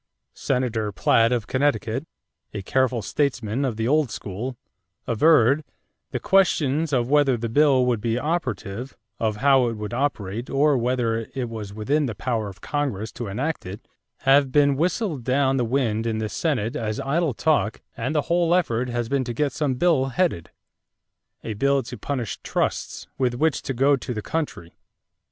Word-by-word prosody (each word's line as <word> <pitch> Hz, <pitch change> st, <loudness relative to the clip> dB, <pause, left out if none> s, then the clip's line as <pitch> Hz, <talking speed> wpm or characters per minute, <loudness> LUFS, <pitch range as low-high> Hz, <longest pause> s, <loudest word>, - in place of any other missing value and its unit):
Senator 120 Hz, -5 st, -1 dB
Platt 115 Hz, +4 st, +3 dB
of 120 Hz, -4 st, 0 dB
Connecticut, 130 Hz, 0 st, 0 dB, 0.5 s
a 100 Hz, -, -4 dB
careful 125 Hz, 0 st, +1 dB
statesman 130 Hz, -4 st, -1 dB
of 125 Hz, -5 st, -1 dB
the 110 Hz, 0 st, -1 dB
old 150 Hz, -1 st, +2 dB
school, 110 Hz, +5 st, -5 dB, 0.5 s
averred: 140 Hz, +2 st, +4 dB, 0.5 s
"The -, -, -3 dB
questions 160 Hz, -5 st, +2 dB
of 120 Hz, -3 st, +1 dB
whether 145 Hz, -4 st, +4 dB
the 115 Hz, +1 st, -3 dB
bill 135 Hz, +1 st, +4 dB
would 120 Hz, -4 st, 0 dB
be 115 Hz, +1 st, 0 dB
operative, 125 Hz, -, -3 dB, 0.2 s
of 110 Hz, -2 st, 0 dB
how 135 Hz, +1 st, +4 dB
it 115 Hz, -, -1 dB
would 105 Hz, +1 st, -6 dB
operate, 120 Hz, -4 st, -2 dB
or 145 Hz, +1 st, +3 dB
whether 120 Hz, -2 st, 0 dB
it 125 Hz, -3 st, -2 dB
was 110 Hz, -3 st, -6 dB
within 135 Hz, +8 st, 0 dB
the 110 Hz, -, -4 dB
power 115 Hz, -4 st, -2 dB
of 95 Hz, -, -13 dB
Congress 130 Hz, -8 st, -2 dB
to 120 Hz, -, -6 dB
enact 135 Hz, +11 st, -2 dB
it, 95 Hz, +3 st, -9 dB, 0.3 s
have 135 Hz, 0 st, +4 dB
been 145 Hz, 0 st, +4 dB
whistled 170 Hz, -, -1 dB
down 135 Hz, +2 st, +2 dB
the 125 Hz, -, +1 dB
wind 115 Hz, -3 st, 0 dB
in 110 Hz, -1 st, -1 dB
this 110 Hz, -1 st, -3 dB
Senate 135 Hz, -6 st, -1 dB
as 110 Hz, -5 st, -2 dB
idle 150 Hz, -1 st, 0 dB
talk 145 Hz, -8 st, +1 dB
and 120 Hz, +7 st, -3 dB
the 150 Hz, -, +2 dB
whole 170 Hz, 0 st, +2 dB
effort 125 Hz, -8 st, 0 dB
has 120 Hz, -1 st, -2 dB
been 140 Hz, +1 st, 0 dB
to 120 Hz, -, -3 dB
get 145 Hz, +4 st, 0 dB
some 145 Hz, -4 st, 0 dB
bill 155 Hz, -2 st, +3 dB
headed: 135 Hz, -, -1 dB, 0.9 s
'A 110 Hz, -, -4 dB
bill 140 Hz, +5 st, +1 dB
to 120 Hz, -, -7 dB
punish 120 Hz, 0 st, -4 dB
trusts,' -, -, -2 dB
with 125 Hz, -2 st, +1 dB
which 155 Hz, +3 st, +1 dB
to -, -, -4 dB
go 135 Hz, +3 st, +3 dB
to 125 Hz, -2 st, -5 dB
the 105 Hz, -, -4 dB
country." 150 Hz, -, -4 dB
130 Hz, 175 wpm, -24 LUFS, 115-145 Hz, 0.9 s, averred